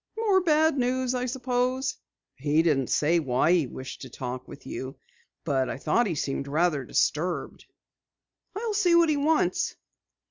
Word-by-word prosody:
"More 410 Hz, -4 st, +3 dB
bad 315 Hz, -3 st, +3 dB
news 255 Hz, 0 st, 0 dB
I 250 Hz, 0 st, -1 dB
suppose." 255 Hz, +1 st, -1 dB, 0.4 s
"He 145 Hz, +4 st, +1 dB
didn't 140 Hz, -6 st, +1 dB
say 165 Hz, +3 st, +2 dB
why 135 Hz, +2 st, +1 dB
he 170 Hz, -6 st, +3 dB
wished 130 Hz, +2 st, -8 dB
to -, -, -8 dB
talk 125 Hz, 0 st, -6 dB
with -, -, -12 dB
you. 130 Hz, +1 st, -6 dB, 0.5 s
I 135 Hz, -3 st, 0 dB
thought 185 Hz, -, +1 dB
he 170 Hz, -, -2 dB
seemed 140 Hz, -1 st, -3 dB
rather 150 Hz, -1 st, +1 dB
disturbed, 160 Hz, +7 st, -1 dB, 0.9 s
though." 415 Hz, -, -4 dB
"I'll 450 Hz, -2 st, -1 dB
see 375 Hz, -5 st, +3 dB
what 340 Hz, -1 st, +5 dB
he 300 Hz, -, +2 dB
wants." 305 Hz, +2 st, +1 dB
180 Hz, 155 wpm, -26 LUFS, -, 0.9 s, what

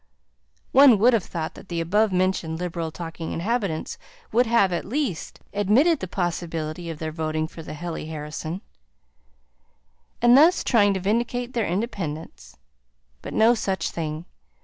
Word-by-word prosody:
One 270 Hz, -4 st, +7 dB
would 240 Hz, +5 st, +5 dB
have 220 Hz, -5 st, +2 dB
thought 160 Hz, -2 st, -4 dB
that -, -, -14 dB
the 170 Hz, -1 st, -2 dB
above 205 Hz, +6 st, +2 dB
mentioned 185 Hz, -3 st, 0 dB
liberal 170 Hz, -2 st, -3 dB
talking 165 Hz, 0 st, -6 dB
inhabitants 200 Hz, -3 st, -2 dB, 0.3 s
would 245 Hz, +1 st, +3 dB
have, 210 Hz, -5 st, +3 dB
at 170 Hz, -, -1 dB
least, 235 Hz, -, -3 dB
admitted 235 Hz, -, +3 dB
the 185 Hz, -, -4 dB
possibility 170 Hz, -2 st, -3 dB
of 165 Hz, -, -5 dB
their 155 Hz, 0 st, -4 dB
voting 155 Hz, 0 st, -2 dB
for 165 Hz, -, -10 dB
the 155 Hz, -, -8 dB
Hely 165 Hz, 0 st, -5 dB
Harrison, 155 Hz, +3 st, -5 dB, 1.6 s
and 240 Hz, +1 st, +6 dB
thus 325 Hz, +6 st, +6 dB
trying 205 Hz, -5 st, +3 dB
to -, -, -1 dB
vindicate 240 Hz, +5 st, -1 dB
their 230 Hz, -3 st, 0 dB
independence. 175 Hz, -5 st, -4 dB, 0.6 s
But -, -, -7 dB
no 225 Hz, +2 st, +5 dB
such 195 Hz, -5 st, -2 dB
thing. 155 Hz, 0 st, -4 dB
180 Hz, 150 wpm, -24 LUFS, 160-225 Hz, 1.6 s, One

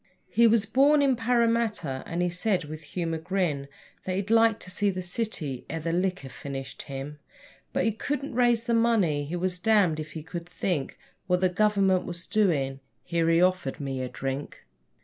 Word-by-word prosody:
He 235 Hz, 0 st, +5 dB
was 225 Hz, -1 st, +4 dB
born 280 Hz, +7 st, +4 dB
in 270 Hz, -2 st, +3 dB
Parramatta, 230 Hz, -, +1 dB
and 170 Hz, +1 st, -1 dB
he 180 Hz, -, +1 dB
said, 180 Hz, +1 st, 0 dB
with 155 Hz, +1 st, -8 dB
humour 165 Hz, +1 st, -3 dB
grim, 165 Hz, -5 st, -1 dB, 0.4 s
That 185 Hz, -, -2 dB
he'd 200 Hz, +3 st, -2 dB
like 225 Hz, -1 st, +5 dB
to 185 Hz, -, -4 dB
see 205 Hz, +2 st, +1 dB
the 185 Hz, -1 st, -3 dB
city 175 Hz, -, -2 dB
ere 165 Hz, -, -3 dB
the 165 Hz, +1 st, -2 dB
liquor 180 Hz, -6 st, -1 dB
finished 135 Hz, +1 st, -7 dB
him, 140 Hz, +2 st, -7 dB, 0.5 s
But -, -, 0 dB
he 225 Hz, -, +2 dB
couldn't 280 Hz, +6 st, -3 dB
raise 240 Hz, -2 st, +3 dB
the 235 Hz, 0 st, -1 dB
money. 210 Hz, -11 st, +2 dB
He 160 Hz, +5 st, -4 dB
was 180 Hz, 0 st, -1 dB
damned 200 Hz, -6 st, +3 dB
if 155 Hz, 0 st, -7 dB
he 160 Hz, -, -6 dB
could 170 Hz, +1 st, -7 dB
think 175 Hz, -5 st, -2 dB, 0.3 s
What 180 Hz, 0 st, +2 dB
the 185 Hz, -, +4 dB
Government 195 Hz, -1 st, +2 dB
was 175 Hz, 0 st, -6 dB
doing. 145 Hz, -11 st, +1 dB, 0.2 s
Here 170 Hz, -1 st, 0 dB
he 165 Hz, +1 st, +4 dB
offered 185 Hz, -7 st, 0 dB
me 135 Hz, -2 st, -3 dB
a 130 Hz, -, -3 dB
drink. 135 Hz, -, -5 dB
180 Hz, 190 wpm, -27 LUFS, 155-220 Hz, 0.5 s, He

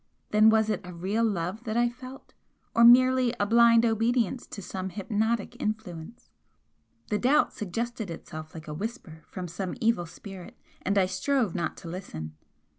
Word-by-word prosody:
Then 215 Hz, +1 st, +6 dB
was 220 Hz, 0 st, +3 dB
it 210 Hz, -, -2 dB
a 180 Hz, -, -9 dB
real 195 Hz, +7 st, -1 dB
love 200 Hz, 0 st, -1 dB
that 220 Hz, 0 st, -2 dB
I 240 Hz, 0 st, +4 dB
felt, 255 Hz, +2 st, -10 dB, 0.4 s
or 235 Hz, -, +4 dB
merely 255 Hz, 0 st, +6 dB
a 205 Hz, -, +2 dB
blind 230 Hz, +1 st, +5 dB
obedience 230 Hz, +1 st, +1 dB
to -, -, -8 dB
some 190 Hz, 0 st, -5 dB
hypnotic 215 Hz, +3 st, -2 dB
influence? 210 Hz, -7 st, -5 dB, 0.8 s
The 210 Hz, -, +1 dB
doubt 290 Hz, +5 st, +3 dB
suggested 225 Hz, +2 st, -4 dB
itself 155 Hz, -1 st, -8 dB
like 160 Hz, -1 st, -9 dB
a 150 Hz, -, -5 dB
whisper 190 Hz, -, -6 dB
from 180 Hz, -1 st, -6 dB
some 180 Hz, +2 st, -4 dB
evil 225 Hz, -8 st, +1 dB
spirit, 185 Hz, +2 st, -11 dB, 0.2 s
and 200 Hz, +1 st, 0 dB
I 190 Hz, -, +5 dB
strove 200 Hz, +4 st, 0 dB
not 170 Hz, -4 st, -3 dB
to -, -, -10 dB
listen. 80 Hz, -, -7 dB
210 Hz, 165 wpm, -27 LUFS, 180-235 Hz, 0.8 s, Then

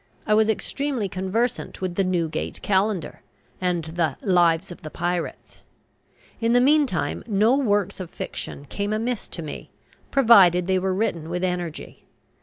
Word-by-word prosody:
I 215 Hz, -, +2 dB
was 215 Hz, +1 st, +4 dB
extremely 265 Hz, 0 st, -1 dB
conversant 195 Hz, +7 st, -2 dB
with 185 Hz, -2 st, -3 dB
the 195 Hz, -, +1 dB
"Newgate 175 Hz, -4 st, -2 dB
Calendar" 195 Hz, -3 st, 0 dB, 0.4 s
and 180 Hz, -2 st, 0 dB
the 160 Hz, -3 st, -1 dB
"Lives 175 Hz, -1 st, +3 dB
of 175 Hz, -, -10 dB
the 155 Hz, -, -7 dB
Pirates." 175 Hz, +2 st, -4 dB, 0.8 s
In 230 Hz, 0 st, +1 dB
the 245 Hz, -, +6 dB
meantime 275 Hz, -, +2 dB
no 215 Hz, +3 st, +3 dB
works 205 Hz, -8 st, 0 dB
of 185 Hz, -3 st, -6 dB
fiction 140 Hz, -, -6 dB
came 200 Hz, +8 st, -3 dB
amiss 230 Hz, +1 st, -2 dB
to 170 Hz, -, -7 dB
me, 150 Hz, -, -7 dB, 0.4 s
provided 195 Hz, -10 st, +6 dB
they 190 Hz, 0 st, +2 dB
were 190 Hz, 0 st, -1 dB
written 170 Hz, -6 st, -1 dB
with 180 Hz, +1 st, -3 dB
energy. 180 Hz, -3 st, -4 dB
190 Hz, 150 wpm, -24 LUFS, 175-220 Hz, 0.8 s, the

